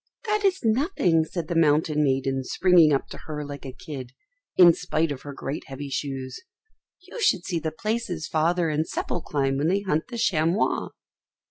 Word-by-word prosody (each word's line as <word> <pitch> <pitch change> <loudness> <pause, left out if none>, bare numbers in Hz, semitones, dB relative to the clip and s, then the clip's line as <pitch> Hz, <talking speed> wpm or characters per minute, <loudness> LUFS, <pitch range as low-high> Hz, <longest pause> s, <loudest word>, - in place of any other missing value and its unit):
"That 425 -1 0
is 385 -1 +2
nothing," 220 - +2
said 165 -1 -5
the 170 - -2
mountain 150 -1 +3
maiden 135 -1 0
springing 175 +1 +4
up 140 - +1
to - - -9
her 150 -1 -4
like 140 -1 -8
a - - -5
kid, 130 -2 -8 0.4
in 175 -2 +9
spite 165 -2 -1
of 135 - -5
her 145 - -8
great 140 +1 -5
heavy 140 0 -7
shoes; 135 -2 -4 0.6
"you 395 +6 -9
should 185 - +2
see 175 -3 -1
the 160 0 -2
places 200 -3 -3
Father 165 +2 +1
and 155 +1 0
Seppel 175 - -3
climb 135 -2 0
when 150 - +1
they 195 +4 +2
hunt 160 -6 -1
the 240 - -7
chamois." 175 -3 +1
160 Hz, 180 wpm, -25 LUFS, 145-185 Hz, 0.6 s, in